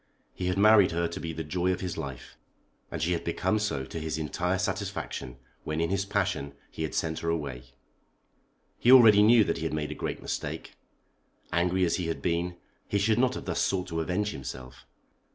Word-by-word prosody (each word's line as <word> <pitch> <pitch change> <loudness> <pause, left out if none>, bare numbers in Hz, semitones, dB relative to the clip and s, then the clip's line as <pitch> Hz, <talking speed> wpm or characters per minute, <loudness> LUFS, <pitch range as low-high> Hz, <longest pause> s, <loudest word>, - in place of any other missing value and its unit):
He 90 - -3
had 90 +1 0
married 105 -1 +6
her 85 0 0
to 85 - -6
be 80 - -4
the 80 0 -5
joy 90 +4 0
of 90 - -2
his 90 -2 -3
life, 70 -6 -7 0.5
and 85 - -5
she 80 +3 0
had 85 - -1
become 110 - 0
so 105 -11 -2
to 80 - -6
his 80 0 -3
entire 90 +4 -1
satisfaction 65 -8 -4 0.3
when 75 +1 -3
in 85 +2 0
his 95 0 0
passion 95 -9 -1 0.2
he - - -7
had 80 - -3
sent 80 -1 -1
her 85 - -2
away. 70 -7 -3 1.1
He 120 - +5
already 115 -5 +9
knew 110 +1 +7
that - - -1
he - - -5
had - - -2
made 75 -1 -3
a - - -2
great - - -4
mistake. - - -5 0.8
Angry 90 +2 +2
as 85 - +1
he 90 -3 -2
had 80 - -2
been, 85 0 -1 0.3
he 100 - 0
should 110 +3 +2
not 130 0 +2
have - - -6
thus - - -1
sought 95 -2 0
to 80 -1 -2
avenge 100 +6 -1
himself. 65 -1 -8
85 Hz, 205 wpm, -28 LUFS, 80-100 Hz, 1.1 s, already